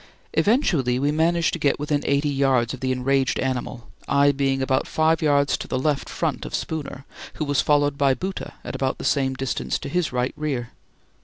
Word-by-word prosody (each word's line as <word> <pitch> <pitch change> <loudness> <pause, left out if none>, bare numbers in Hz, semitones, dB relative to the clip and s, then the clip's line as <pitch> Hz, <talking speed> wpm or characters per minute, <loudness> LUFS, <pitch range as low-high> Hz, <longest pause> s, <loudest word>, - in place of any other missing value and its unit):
Eventually 170 - +2
we 140 +3 +1
managed 165 +2 +2
to 170 - -3
get 145 -2 +2
within 150 0 0
eighty 140 +1 +1
yards 135 -4 +1
of 130 - -7
the 130 0 -1
enraged 135 +1 +1
animal, 130 -2 -3 0.2
I 140 0 +4
being 135 -1 0
about 130 0 0
five 160 +1 +2
yards 140 -2 +3
to - - -6
the 130 - -2
left 145 +1 -1
front - - -2
of - - -4
Spooner, 145 -4 -5 0.3
who 155 - -2
was 145 -2 +2
followed 145 -1 +2
by 135 -2 +3
Bhoota 185 +9 -5
at - - -6
about 130 -1 -1
the - - -8
same 135 -2 +1
distance 135 0 -2
to - - -7
his 180 +1 0
right 125 +1 -1
rear. 135 -6 -3
140 Hz, 200 wpm, -23 LUFS, 130-150 Hz, 0.3 s, I